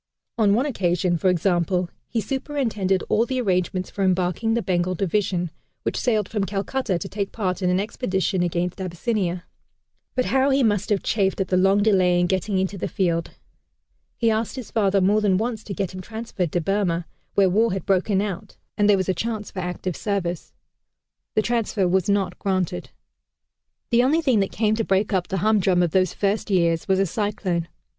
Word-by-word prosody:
On 205 -2 +4
one 250 +5 +1
occasion, 180 - 0
for 185 +3 +2
example, 180 0 +1 0.2
he 235 - -1
superintended 225 -7 -1
all 220 - +3
the 260 -1 -1
arrangements 185 -4 0
for 200 - -2
embarking 185 +4 +1
the 235 - 0
Bengal 180 -1 0
Division, 185 -2 0 0.3
which - - -2
sailed 215 -5 +1
from 210 -3 -2
Calcutta 200 +1 -1
to 185 - -5
take 200 0 -3
part 190 -4 -2
in 180 - +1
an 180 +1 +2
expedition 190 -3 -1
against 175 +2 -1
Abyssinia. 185 -1 -2 0.7
But 255 - +1
how 265 +1 +2
he 270 0 +3
must 205 -3 +1
have 205 -3 +1
chafed 195 -3 0
at 190 - -1
the 185 - +2
long 195 +2 +4
delay 185 -4 +3
in 175 - +3
getting 190 +2 0
into 190 +1 -1
the - - -2
field. 170 -4 0 0.9
He 230 -1 +2
asked 220 +1 -1
his 255 -4 -7
father 200 -3 +2
more 205 +3 +3
than 195 -3 +3
once 220 0 -2
to 200 - -5
get 190 -2 -2
him 185 - -6
transferred 220 -5 -4
to 175 - +1
Burma, 175 -2 0 0.3
where 195 -1 +5
war 215 +5 +2
had 190 -2 -3
broken 195 +1 +2
out 200 -4 -5 0.2
and 205 0 +4
there 200 - +6
was 185 - -1
a 190 - +2
chance 215 +3 -4
for 190 - -6
active 180 -1 -3
service. 185 -4 -3 0.8
The 215 - +3
transfer 220 -4 0
was 185 +1 +1
not 195 -3 0
granted. 185 - -1 1.0
The 235 0 +5
only 295 +6 +3
thing 255 -7 +3
that 195 - 0
came 215 0 +1
to 225 - +1
break 200 +1 +1
up 180 -2 +1
the 190 - -2
humdrum 195 -4 +3
of 170 - 0
those 185 -1 +2
first 205 +2 0
years 170 -4 +2
was 190 -1 +3
a 195 - +3
cyclone. 190 -3 -2
195 Hz, 195 wpm, -23 LUFS, 180-215 Hz, 1.0 s, there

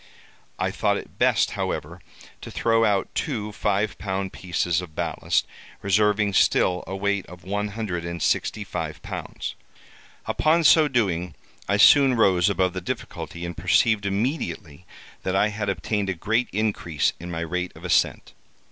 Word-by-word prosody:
I - - -1
thought - - +1
it - - -10
best, - - +3
however, - - -4 0.4
to - - -8
throw 115 0 +2
out 100 -3 +1
two 110 -7 -2
five 105 0 -1
pound 95 -1 -3
pieces 90 -1 -1
of 85 -4 -11
ballast, - - 0 0.4
reserving 105 +1 +2
still 90 -1 +3
a 95 - -4
weight 100 0 0
of 90 0 -13
one 105 +2 -2
hundred 100 -5 -4
and 85 0 -5
sixty - - 0
five - - -5
pounds. - - -5 0.7
Upon 165 +2 +2
so 155 0 +6
doing, 90 - 0 0.3
I 100 - +3
soon 135 +4 +7
rose 95 -4 +4
above 95 -2 +1
the 95 - -4
difficulty, 85 0 -5
and 85 0 -5
perceived 105 +2 +2
immediately, 100 - -3 0.3
that 95 - -2
I 105 +2 +3
had 105 -1 -3
obtained 100 0 -1
a 95 - -1
great 110 +8 0
increase 100 -7 0
in 85 - -7
my 85 -1 -4
rate 90 +2 -2
of - - -11
ascent. - - +1
100 Hz, 155 wpm, -24 LUFS, 90-110 Hz, 0.7 s, soon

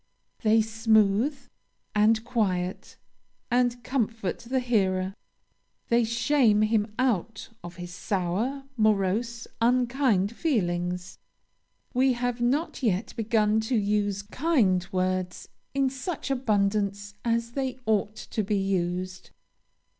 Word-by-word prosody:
They 220 0 +4
smooth, 220 +4 +2 0.6
and 220 +1 +3
quiet, 190 -6 -2 0.5
and 245 -1 +1
comfort 225 -6 -2
the 260 +2 -1
hearer. 190 -6 +1 0.8
They 235 0 +4
shame 235 -2 +3
him 215 -1 +1
out 225 -4 -1
of 175 +1 -8
his 175 -1 -8
sour, 200 +9 -2
morose, 215 +2 +1 0.2
unkind 240 -4 +2
feelings. 180 - -1 0.7
We 260 +1 +3
have 245 0 -2
not 280 +8 0
yet 210 -4 0
begun 220 -1 +2
to 220 +3 -1
use 205 -1 0
kind 210 - +1
words 185 -1 -1 0.3
in 275 -1 +3
such 275 +2 -4
abundance 205 -4 0
as 230 0 0
they 265 0 -2
ought 215 -1 +1
to 220 - -4
be 205 +1 0
used." 185 -1 -2
220 Hz, 110 wpm, -27 LUFS, 195-245 Hz, 0.8 s, They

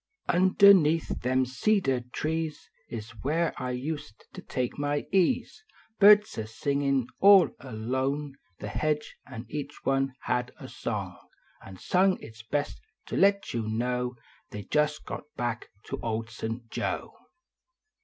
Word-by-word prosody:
Underneath 185 -3 +5
them 130 +1 +2
cedar 135 - +1
trees 155 +5 -4 0.2
S 110 -1 -6
where 160 +4 0
I 125 - -2
used 145 +4 -5
to 185 - -8
take 125 -5 -3
my 145 0 -1
ease. 195 - +1 0.4
Hirds 210 - +6
a 110 - -4
singin 140 +2 0
all 195 -1 +7
along 130 +4 -3 0.2
The - - -6
hedge, 150 -1 -1
an 125 -2 -8
each 145 +3 -7
one 135 -1 +1
had 125 0 -1
a - - -8
song - - -4 0.4
An 95 -1 -11
sung 185 - +2
its 110 -1 -11
best 145 +6 -3 0.2
to - - -5
let 200 0 +3
yon 110 -1 -2
know 125 +1 -1 0.3
They 105 0 -7
jist 150 +7 0
got - - -6
back 120 -2 -3 0.2
to - - -4
Old 115 0 -3
St. 115 +2 -5
Joe. - - -3
135 Hz, 135 wpm, -28 LUFS, 120-160 Hz, 0.4 s, all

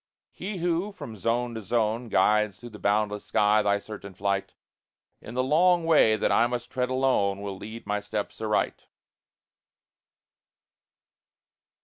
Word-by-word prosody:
He 195 +1 -6
who, 175 +3 -1
from 145 - -9
zone 115 +4 -1
to 110 - -5
zone, 115 +2 -1
Guides 105 -4 +2
through 120 - -10
the 105 - -11
boundless 105 0 0
sky 105 +2 +3
thy 100 -1 +2
certain 100 -2 -9
flight, 100 0 -2 0.7
In 115 - -9
the 130 - +1
long 170 +5 +3
way 150 -9 +5
that - - 0
I 120 - +4
must 120 0 -4
tread 125 -1 -1
alone, 130 -7 +1
Will 100 -1 -5
lead 110 +4 -9
my 105 0 -1
steps 105 +1 -5
aright. 105 -1 -1
110 Hz, 140 wpm, -27 LUFS, 105-130 Hz, 0.7 s, way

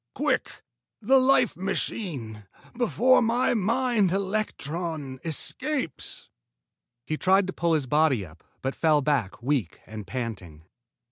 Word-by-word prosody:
Quick, - - -1 0.4
the 265 +5 +4
life 255 -3 +3
machine, 155 - -3 0.3
before 250 +2 +3
my 235 +2 +2
mind 230 -2 +1
electron 170 -8 -3
escapes." 255 - -2 0.8
He 155 - -2
tried 190 +3 +3
to 190 - -5
pull 170 -1 0
his 150 -4 +1
body 140 -6 +2
up, 80 0 -17 0.2
but 135 +1 -1
fell 155 -3 +2
back, 130 -7 -1
weak 125 - -1
and 110 -2 -8
panting. 95 -11 -6
165 Hz, 120 wpm, -26 LUFS, 130-215 Hz, 0.8 s, the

